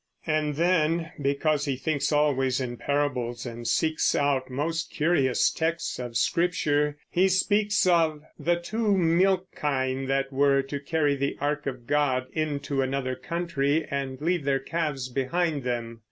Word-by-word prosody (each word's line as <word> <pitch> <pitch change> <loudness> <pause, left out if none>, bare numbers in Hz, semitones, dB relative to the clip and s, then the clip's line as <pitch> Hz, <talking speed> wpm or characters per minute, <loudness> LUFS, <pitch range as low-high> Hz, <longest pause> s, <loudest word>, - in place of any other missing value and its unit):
And 155 -2 0
then, 165 0 +1
because 145 +1 +1
he 140 -2 -1
thinks 145 +3 -1
always 140 -4 +2
in 125 -2 -3
parables 125 -4 -1
and 120 -1 -6
seeks 155 +6 +1
out 140 -2 +1
most 160 +6 -2
curious 150 -5 +2
texts 165 -1 -2
of 120 -2 -3
Scripture, 150 -4 +1
he 185 +2 +3
speaks 205 +2 +2
of 165 -4 +2 0.2
"the 175 +1 +2
two 205 +4 0
milch 185 +2 +3
kine 135 -2 -1
that 135 0 0
were 140 0 +3
to 140 +1 -5
carry 145 0 +1
the 140 0 -2
ark 150 0 -1
of 125 -3 -5
God 135 -2 +1
into 145 -3 -1
another 130 -1 -1
country 160 -3 -1
and 135 -2 -3
leave 170 +1 0
their 135 0 +2
calves 140 -2 -2
behind 145 +4 -1
them." 120 -2 -3
145 Hz, 150 wpm, -26 LUFS, 135-165 Hz, 0.2 s, he